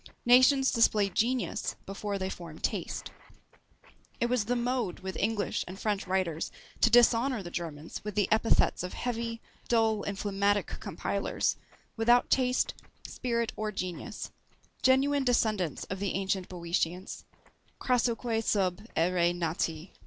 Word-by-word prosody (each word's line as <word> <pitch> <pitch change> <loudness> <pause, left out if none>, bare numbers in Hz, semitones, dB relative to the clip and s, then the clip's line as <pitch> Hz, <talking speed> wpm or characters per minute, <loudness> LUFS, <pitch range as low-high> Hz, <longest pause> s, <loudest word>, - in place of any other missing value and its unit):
Nations 255 +2 +6
display 215 -3 +3
genius 235 +1 -1
before 200 +1 -4
they 190 0 -3
form 165 -3 -9
taste. - - -3 1.1
It 235 +1 0
was 250 -4 +1
the 245 +3 0
mode 240 -6 -1
with 190 0 -5
English 210 0 0
and 185 +2 -8
French 210 -3 -1
writers 180 -4 -1 0.3
to 230 - +5
dishonour 240 0 +4
the 175 - -8
Germans 160 -3 -6
with 210 -1 -5
the 205 -3 +2
epithets 220 +1 +3
of 180 +1 -5
heavy, 230 -1 -3 0.2
dull, 225 -2 +2
and 200 0 -4
phlegmatic 205 0 +1
compilers, - - -1 0.4
without 240 +2 +4
taste, 250 -1 +2 0.3
spirit, 235 -2 -2
or 215 0 -2
genius; 185 -3 -5 0.5
genuine 275 +2 +3
descendants 215 - +1
of 190 - -5
the 200 -1 -1
ancient 190 -1 -1
Boeotians, 175 0 -3 0.5
Crassoque 235 -2 +1
sub 185 -5 +1 0.2
æëre 175 +1 +2
nati. 165 0 -2
210 Hz, 130 wpm, -30 LUFS, 185-235 Hz, 1.1 s, Nations